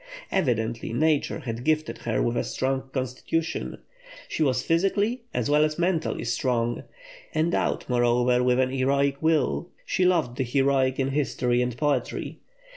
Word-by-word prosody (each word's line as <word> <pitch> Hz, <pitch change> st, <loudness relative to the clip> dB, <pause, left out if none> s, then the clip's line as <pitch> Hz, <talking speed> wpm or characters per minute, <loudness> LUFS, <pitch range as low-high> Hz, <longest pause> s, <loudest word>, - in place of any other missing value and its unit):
Evidently 115 Hz, -, 0 dB
nature 150 Hz, +4 st, +1 dB
had 115 Hz, -1 st, -5 dB
gifted 155 Hz, +1 st, 0 dB
her 115 Hz, -2 st, -1 dB
with 120 Hz, -, 0 dB
a -, -, 0 dB
strong 135 Hz, 0 st, -2 dB
constitution: 130 Hz, +5 st, -2 dB, 0.5 s
she -, -, -4 dB
was 130 Hz, -4 st, +2 dB
physically 200 Hz, -, +1 dB
as -, -, -1 dB
well 150 Hz, +1 st, +4 dB
as 155 Hz, 0 st, 0 dB
mentally 175 Hz, -2 st, 0 dB
strong. 120 Hz, -3 st, 0 dB, 0.5 s
Endowed, 160 Hz, +2 st, 0 dB
moreover, 125 Hz, 0 st, +3 dB
with 125 Hz, 0 st, +3 dB
an 130 Hz, 0 st, +2 dB
heroic 140 Hz, +1 st, +1 dB
will, 160 Hz, +2 st, +1 dB, 0.2 s
she 185 Hz, -, 0 dB
loved 165 Hz, -9 st, +2 dB
the -, -, +3 dB
heroic 135 Hz, +1 st, +2 dB
in 135 Hz, 0 st, +1 dB
history 125 Hz, -3 st, 0 dB
and 125 Hz, -1 st, -2 dB
poetry. 140 Hz, -3 st, -1 dB
135 Hz, 145 wpm, -26 LUFS, 125-155 Hz, 0.5 s, well